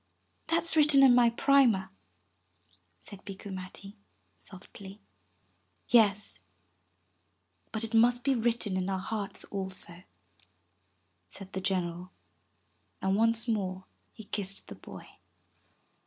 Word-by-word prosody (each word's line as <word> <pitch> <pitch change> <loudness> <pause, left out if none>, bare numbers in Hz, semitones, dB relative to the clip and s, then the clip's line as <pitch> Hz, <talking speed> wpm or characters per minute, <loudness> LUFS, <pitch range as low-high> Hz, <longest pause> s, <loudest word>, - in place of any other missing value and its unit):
"That's 330 0 +2
written 295 -3 +6
in 260 -2 +7
my 245 -1 +5
primer," 230 -7 +3 1.1
said 200 -2 -13
Bikku 195 0 -8
Matti 190 +2 -8 0.4
softly. 195 +1 -11 0.9
"Yes, 210 -3 +3 1.3
but 220 0 -1
it 225 0 -2
must 240 +2 +4
be 275 - +2
written 230 -5 0
in 185 +1 -2
our 190 - -1
hearts 200 +1 -4
also," 190 -3 -6 1.3
said 195 -1 -12
the 190 - -3
general, 180 -1 -2 0.9
and 190 0 0
once 230 +2 +1
more 190 -4 -2 0.3
he 220 - -12
kissed 195 -1 -2
the - - -8
boy. - - -12
205 Hz, 110 wpm, -29 LUFS, 190-235 Hz, 1.3 s, in